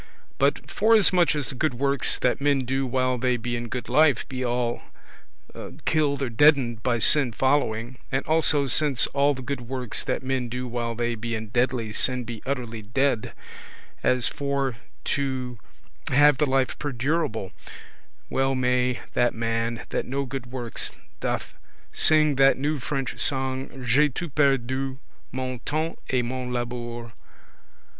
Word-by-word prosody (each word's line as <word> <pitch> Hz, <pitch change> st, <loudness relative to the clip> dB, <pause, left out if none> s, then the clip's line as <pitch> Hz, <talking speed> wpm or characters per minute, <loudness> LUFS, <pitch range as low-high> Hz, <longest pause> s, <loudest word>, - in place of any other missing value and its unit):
But 140 Hz, +2 st, +1 dB
forasmuch 200 Hz, -7 st, +4 dB
as 145 Hz, -3 st, -1 dB
the -, -, -3 dB
good 130 Hz, +1 st, -1 dB
works 140 Hz, +1 st, +1 dB
that 125 Hz, +2 st, 0 dB
men 140 Hz, -2 st, +2 dB
do 135 Hz, +1 st, -1 dB
while 130 Hz, 0 st, 0 dB
they 125 Hz, 0 st, +1 dB
be 120 Hz, +1 st, -3 dB
in 120 Hz, 0 st, -4 dB
good 125 Hz, +2 st, -5 dB
life 150 Hz, -5 st, +3 dB
be 130 Hz, -1 st, -4 dB
all 120 Hz, -1 st, -1 dB, 0.7 s
amortised -, -, -10 dB
[killed, 140 Hz, -6 st, 0 dB
deadened] 135 Hz, -7 st, +4 dB
by 120 Hz, 0 st, +1 dB
sin 130 Hz, +2 st, +3 dB
following, 125 Hz, -2 st, 0 dB
and 135 Hz, 0 st, -1 dB
also 155 Hz, -2 st, +3 dB
since 140 Hz, -1 st, +4 dB
all 140 Hz, 0 st, +1 dB
the 130 Hz, -, -8 dB
good 140 Hz, 0 st, -4 dB
works 125 Hz, -1 st, -3 dB
that -, -, -2 dB
men 130 Hz, -2 st, -1 dB
do 125 Hz, +1 st, -4 dB
while 120 Hz, -1 st, -3 dB
they 120 Hz, +1 st, -1 dB
be 115 Hz, +1 st, -4 dB
in 110 Hz, -1 st, -6 dB
deadly 120 Hz, -2 st, 0 dB
sin 125 Hz, +2 st, +1 dB
be 115 Hz, -1 st, -7 dB
utterly 120 Hz, -5 st, -3 dB
dead, 120 Hz, +2 st, 0 dB, 0.7 s
as 125 Hz, -1 st, +2 dB
for 140 Hz, -3 st, -1 dB, 0.3 s
to 130 Hz, -4 st, -2 dB, 0.5 s
have 145 Hz, 0 st, +5 dB
the 150 Hz, -, +3 dB
life 130 Hz, -1 st, 0 dB
perdurable 135 Hz, -, -2 dB
[everlasting], 65 Hz, 0 st, -18 dB
well 135 Hz, 0 st, +1 dB
may 125 Hz, 0 st, +1 dB
that 120 Hz, 0 st, +2 dB
man 115 Hz, 0 st, -2 dB
that -, -, -2 dB
no 140 Hz, +2 st, -2 dB
good 130 Hz, -1 st, -6 dB
works 120 Hz, -2 st, -2 dB, 0.3 s
doth, -, -, -3 dB, 0.4 s
sing 155 Hz, -3 st, +4 dB
that 135 Hz, 0 st, +5 dB
new 145 Hz, +2 st, -1 dB
French 135 Hz, 0 st, -3 dB
song, 130 Hz, -1 st, -1 dB
J'ai 145 Hz, +6 st, +4 dB
tout 150 Hz, +2 st, -6 dB
perdu 135 Hz, -2 st, +1 dB, 0.2 s
— -, -, -36 dB
mon 130 Hz, -1 st, -4 dB
temps 155 Hz, +5 st, -2 dB
et 130 Hz, -2 st, +1 dB
mon 125 Hz, 0 st, -4 dB
labour 120 Hz, -1 st, -4 dB
<5>. -, -, -21 dB
130 Hz, 160 wpm, -25 LUFS, 120-140 Hz, 0.7 s, have